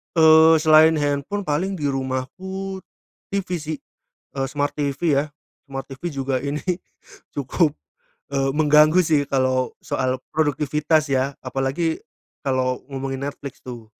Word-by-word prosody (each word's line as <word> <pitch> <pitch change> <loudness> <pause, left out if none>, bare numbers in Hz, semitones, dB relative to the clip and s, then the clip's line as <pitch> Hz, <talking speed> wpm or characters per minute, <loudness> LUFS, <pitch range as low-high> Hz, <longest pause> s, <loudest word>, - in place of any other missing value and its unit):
Eee, 160 0 +7
selain 155 +1 +7
handphone 145 +7 -1
paling 185 +4 -1
di 145 -5 -1
rumahku 185 +9 -4 0.5
TV 200 -1 -2
sih. 155 +1 -4 0.6
Eee, 135 -1 -1
smart 145 +2 -1
TV 145 +2 -1
ya, 140 +1 +2 0.4
smart 135 -1 -6
TV 135 +6 -5
juga 135 -2 -1
ini 140 +3 -3 0.7
cukup, 145 +4 +1 0.6
eee, 135 0 +1
mengganggu 150 +2 +5
sih 150 -3 +3
kalau 130 -2 +1
soal 130 -1 -1 0.2
produktivitas 150 0 +1
ya. 130 +1 +1
Apalagi, 135 +5 -1 0.4
kalau 130 -2 0
ngomongin 135 0 -4
Netflix 140 -2 -8
tuh, 120 -3 -8
145 Hz, 125 wpm, -22 LUFS, 135-160 Hz, 0.7 s, Eee